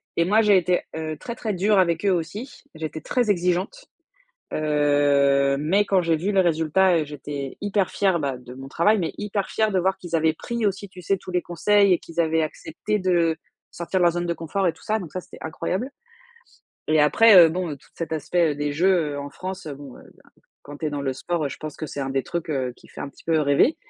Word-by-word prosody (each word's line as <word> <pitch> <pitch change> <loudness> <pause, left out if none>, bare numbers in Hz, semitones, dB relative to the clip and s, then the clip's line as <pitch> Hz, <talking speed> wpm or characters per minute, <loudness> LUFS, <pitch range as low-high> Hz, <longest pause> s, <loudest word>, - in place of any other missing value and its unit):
et 170 - +2
moi, 210 +5 +4
j'ai 205 -3 +5
été, 180 0 +1
heu, 155 -1 -4
très, 235 - -6
très 220 -4 -3
dure 200 +3 +2
avec 170 -2 +2
eux 200 - +4
aussi. 185 - -4
J'étais 155 0 -5
très 245 -4 0
exigeante, 180 - -1 0.7
heu 150 -1 +1 0.7
mais 180 +8 +2
quand 195 -2 +2
j'ai 165 -1 +1
vu 180 +6 -2
les 195 - +4
résultats, 170 +1 +3
heu, 155 - 0
j'étais 145 -1 -6
hyper 205 -2 0
fière, 190 -4 +1
bah, 140 -3 -2
de 125 0 -12
mon 135 +1 -9
travail 205 +9 +2
mais 170 - -2
hyper 205 -1 -2
fière 220 -1 +1
de 190 - +2
voir 190 +2 +1
qu'ils 175 -2 -8
avaient 160 0 +2
pris 235 +6 -4
aussi, 200 0 -2
tu 185 -1 -12
sais, 195 +3 +1
tous 185 - -10
les 180 -1 +1
conseils 200 +3 +3
et 175 - +3
qu'ils 165 0 -5
avaient 160 -1 +2
accepté 165 +6 -3
de 170 -3 +2 0.4
sortir 170 +2 -2
de - - +1
leur 175 -1 +4
zone 175 +1 -2
de 170 - -1
confort 175 +4 -2
et - - 0
tout - - -21
ça. 215 +1 0
Donc 170 -5 -8
ça, 185 - -3
c'était - - -14
incroyable 185 - -3 1.0
et 155 0 +4
après, 200 +9 +6
heu, 170 -2 +9
bon, 175 0 -3
toute - - -24
cet 165 -1 -5
aspect 160 0 +1
des 145 0 -2
Jeux, 170 -1 +2
heu, - - -4
en 140 0 -7
France, 185 +2 -7
bon, 140 -2 -9
heu, - - -14 0.6
quand 145 0 -10
tu 155 - -3
es - - -1
dans 145 -1 -4
le 135 -1 -1
sport, 160 +5 -3
heu, - - -1
je - - -8
pense 155 -1 -7
que 155 - -5
c'est 145 - -6
un 135 -1 -3
des 135 0 0
trucs, 170 -2 -4
heu, 130 -4 -1
qui - - -19
fait - - -11
un - - -4
petit - - -18
peu 165 -1 +2
rêver 145 - +3
170 Hz, 240 wpm, -23 LUFS, 155-190 Hz, 1.0 s, heu